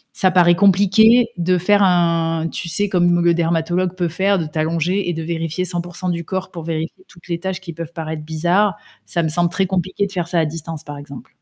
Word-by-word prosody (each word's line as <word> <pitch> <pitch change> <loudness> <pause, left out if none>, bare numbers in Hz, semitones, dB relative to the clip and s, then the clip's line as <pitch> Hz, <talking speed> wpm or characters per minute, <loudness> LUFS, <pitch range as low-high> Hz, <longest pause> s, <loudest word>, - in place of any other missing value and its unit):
ça 185 -1 +3
paraît 175 -1 +5
compliqué 205 +5 +5
de 180 +1 +1
faire 205 +3 +3
un 165 -3 +2
tu 170 - -5
sais 205 +6 0
comme 175 -2 +2
le 170 - +4
dermatologue 170 +2 0
peut 175 -2 -1
faire, 190 +3 +1
de 160 - -2
t'allonger 165 +5 -1
et - - -1
de 165 - -4
vérifier 165 +2 -3
100% 175 +1 -4
du 170 -1 -2
corps 190 +1 -4
pour 170 -2 -7
vérifier 165 - -4
toutes 170 0 -18
les 170 -1 -2
tâches 190 0 -4
qui 170 - -9
peuvent 165 0 -7
paraître 160 -1 -5
bizarres. 175 +5 +1 0.3
Ça 170 -1 -1
me - - +1
semble 175 +2 +1
très 190 +2 0
compliqué 190 +2 -1
de - - -14
faire 175 -2 -2
ça 175 - +1
à 160 - +2
distance 160 0 -6
par 145 -1 -7
exemple. 140 -2 -11
175 Hz, 220 wpm, -19 LUFS, 165-185 Hz, 0.3 s, paraît